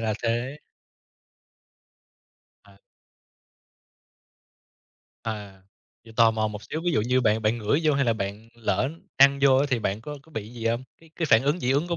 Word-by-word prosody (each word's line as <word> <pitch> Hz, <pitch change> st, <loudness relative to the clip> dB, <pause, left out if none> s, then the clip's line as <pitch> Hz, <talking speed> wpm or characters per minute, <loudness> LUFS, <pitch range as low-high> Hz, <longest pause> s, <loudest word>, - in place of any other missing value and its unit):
là 110 Hz, -1 st, 0 dB
thế. 120 Hz, +5 st, -1 dB, 2.1 s
À. 100 Hz, -, -19 dB, 2.5 s
À. 100 Hz, -4 st, -6 dB, 0.4 s
Vậy 115 Hz, -, -14 dB
tò 115 Hz, -1 st, +6 dB
mò 110 Hz, -1 st, 0 dB
một 105 Hz, 0 st, -8 dB
xíu, 155 Hz, +10 st, -5 dB
ví 175 Hz, -, +1 dB
dụ -, -, +2 dB
như 125 Hz, +4 st, +2 dB
bạn 110 Hz, -1 st, +2 dB
bạn 110 Hz, +2 st, +1 dB
ngửi 115 Hz, +8 st, +1 dB
vô 155 Hz, -2 st, +3 dB
hay 140 Hz, 0 st, +2 dB
là 115 Hz, -, +3 dB
bạn 105 Hz, +1 st, -5 dB
lỡ 115 Hz, +2 st, 0 dB, 0.3 s
ăn 140 Hz, 0 st, +6 dB
vô 135 Hz, -2 st, +6 dB
á 140 Hz, +2 st, +3 dB
thì 125 Hz, -, +2 dB
bạn 100 Hz, -1 st, -2 dB
có 145 Hz, +5 st, -7 dB
có 160 Hz, -, -22 dB
bị 110 Hz, -4 st, -5 dB
gì 115 Hz, -1 st, -5 dB
hông? 115 Hz, +2 st, 0 dB, 0.2 s
Cái 165 Hz, -1 st, -19 dB
cái 165 Hz, -, -1 dB
phản 115 Hz, -4 st, +5 dB
ứng 145 Hz, +5 st, +1 dB
dị 125 Hz, -, 0 dB
ứng 145 Hz, +6 st, +1 dB
của 170 Hz, -, -1 dB
115 Hz, 185 wpm, -25 LUFS, 110-140 Hz, 2.5 s, tò